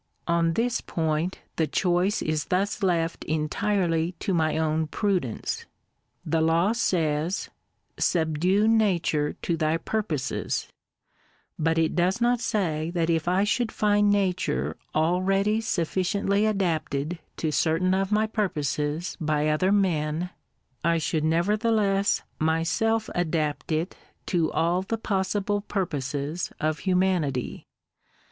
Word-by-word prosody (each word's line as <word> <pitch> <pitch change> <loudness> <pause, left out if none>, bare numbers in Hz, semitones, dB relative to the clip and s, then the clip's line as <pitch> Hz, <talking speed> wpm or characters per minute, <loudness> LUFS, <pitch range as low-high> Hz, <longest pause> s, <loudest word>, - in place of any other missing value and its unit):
On 170 -1 +2
this 240 +5 0
point 160 +2 -2 0.2
the 160 - +2
choice 180 +5 +1
is 155 -1 -1
thus 195 +3 0
left 170 -4 0
entirely 165 +2 0
to 195 +2 -3
my 160 -2 +1
own 160 0 0
prudence. 180 - -2 0.6
The 165 -1 +1
law 165 +5 +3
says, 165 -6 0 0.2
— - - -49
" - - -45
Subdue 175 +5 +2
Nature 180 -9 +2
to 170 - 0
thy 160 0 +1
purposes 165 -7 -2 0.3
;" - - -40
— - - -38
but 165 - +1
it 165 -1 +2
does 180 +5 +2
not 240 0 +2
say 165 -9 -1
that 170 -1 +1
if 165 0 0
I 185 +3 +3
should 225 +2 0
find 205 -1 +3
Nature 180 - 0 0.2
already 195 +6 +2
sufficiently 200 +1 0
adapted 165 -5 -1 0.2
to 155 - -1
certain 165 +5 +2
of 195 +1 0
my 215 +1 +3
purposes 160 -6 -2
by 155 -1 +1
other 170 +5 +2
men, 175 -3 +1 0.5
I 170 +1 +3
should 155 -1 -1
nevertheless 200 +4 +2 0.2
myself 165 +8 +1
adapt 160 -3 -1
it 160 +4 -1 0.3
to 170 -3 +1
all 170 +3 +1
the 225 +4 -3
possible 205 0 -1
purposes 150 -5 -3
of 155 0 0
humanity. 180 -9 0
175 Hz, 125 wpm, -26 LUFS, 155-200 Hz, 0.6 s, law